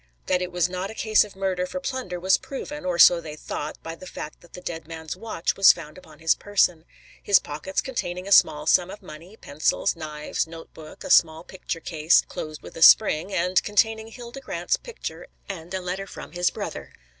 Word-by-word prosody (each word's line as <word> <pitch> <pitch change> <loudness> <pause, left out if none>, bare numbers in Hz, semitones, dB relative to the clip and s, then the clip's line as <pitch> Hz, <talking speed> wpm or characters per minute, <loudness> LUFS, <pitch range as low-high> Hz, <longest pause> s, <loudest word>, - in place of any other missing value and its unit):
That 185 -1 +1
it 180 0 -3
was 175 -1 +1
not 185 +2 -4
a 220 - -9
case 220 -1 +3
of 210 -2 -12
murder 190 -2 -1
for 275 - -5
plunder 255 -10 -4
was 190 +2 +3
proven, 275 +1 -7
or 180 -2 -1
so 170 0 +7
they 155 -2 -8
thought, 150 0 -6
by 165 - -6
the 185 +3 -11
fact 155 - -8
that 175 - -20
the - - -8
dead 165 -3 -6
man's 160 -2 -6
watch 220 -7 -3
was 195 - +8
found 150 - -9
upon 160 -4 -15
his 160 +1 +3
person; 180 -5 +1 0.4
his 200 - +5
pockets 155 +6 -3
containing 185 -8 -4
a - - -6
small 155 -6 +5
sum 180 0 +3
of 205 - -10
money, 165 +8 -12
pencils, 145 0 0
knives, 155 -1 -4
note 165 0 -11
book, 155 -1 -12
a - - -4
small 160 0 +4
picture 180 -2 -6
case, 160 0 +3
closed 155 -1 -7
with - - -11
a - - -8
spring, 175 0 +6
and 180 0 +2
containing 220 +1 +1
Hilda 240 +3 -10
Grant's - - -1
picture, - - -8 0.2
and 175 -3 -7
a 190 - -2
letter 185 +2 -4
from - - -10
his 175 0 +1
brother. - - -7
180 Hz, 210 wpm, -24 LUFS, 160-200 Hz, 0.4 s, was